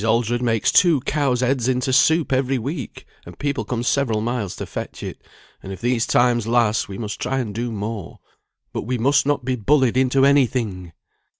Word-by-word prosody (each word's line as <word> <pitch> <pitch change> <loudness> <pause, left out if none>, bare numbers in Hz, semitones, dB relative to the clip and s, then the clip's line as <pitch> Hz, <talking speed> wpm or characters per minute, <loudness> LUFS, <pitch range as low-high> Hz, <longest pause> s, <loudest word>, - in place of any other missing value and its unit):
Aldred 115 +2 +1
makes 115 -3 +1
two 170 -5 +4
cows' 135 -3 0
heads 125 -1 +1
into 130 0 0
soup 160 +2 +3
every 130 0 +1
week, 135 +1 -6 0.2
and - - -12
people 140 -1 -2
come 120 -2 -3
several 125 -4 +1
miles 110 -3 -3
to - - -6
fetch - - -7
it; - - -7 0.4
and 95 - -8
if 95 - -7
these 120 0 0
times 120 -2 +2
last 115 -3 +1
we 95 - -6
must 105 -2 -5
try 135 +2 -1
and 115 -6 -3
do 120 +2 -3
more. 105 -3 -5 0.6
But - - -2
we 125 +3 -2
must 140 +4 +2
not 145 -4 0
be 130 -1 0
bullied 130 +1 +2
into 130 +1 +3
any 140 -2 +5
thing!" 95 -9 -4
125 Hz, 195 wpm, -21 LUFS, 115-135 Hz, 0.6 s, any